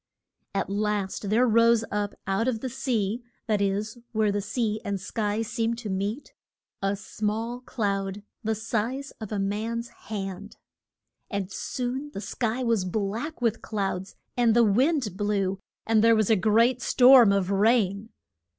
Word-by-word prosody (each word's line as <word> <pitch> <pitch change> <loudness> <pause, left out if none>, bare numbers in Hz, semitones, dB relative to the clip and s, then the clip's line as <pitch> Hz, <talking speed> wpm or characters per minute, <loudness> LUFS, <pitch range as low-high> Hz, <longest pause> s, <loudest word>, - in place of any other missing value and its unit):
At 195 - 0
last 205 -1 -1
there 230 +4 +4
rose 230 -1 +4
up 205 0 -2
out 195 +5 0
of 230 -4 -1
the 260 - -3
sea 235 -4 -1 0.2
that 210 -3 +1
is, 205 +4 -1
where 215 -2 +2
the 205 0 -1
sea 215 +1 -1
and 200 -1 -2
sky 210 +2 -1
seem 230 +1 -1
to 230 -4 -5
meet 200 +8 -3 0.5
a 195 +1 +1
small 220 +4 -3
cloud, 200 -4 -2 0.2
the 220 0 0
size 235 +6 -2
of 220 - -6
a 210 - -1
man's 220 +4 -2 0.2
hand. 195 -1 -5 0.7
And 200 -2 -3
soon 255 +7 -3
the - - -3
sky 235 +3 -2
was 230 -5 +2
black 220 - -3
with 230 -1 +1
clouds, 195 -3 -3 0.2
and 235 -2 +3
the 240 - +6
wind 245 - +2
blew, 200 -2 0 0.3
and 220 -1 +3
there 230 0 +6
was 215 -1 +2
a - - +6
great 230 +5 +3
storm 250 -3 +7
of 195 -1 +1
rain. 205 0 +2
215 Hz, 155 wpm, -26 LUFS, 200-235 Hz, 0.7 s, storm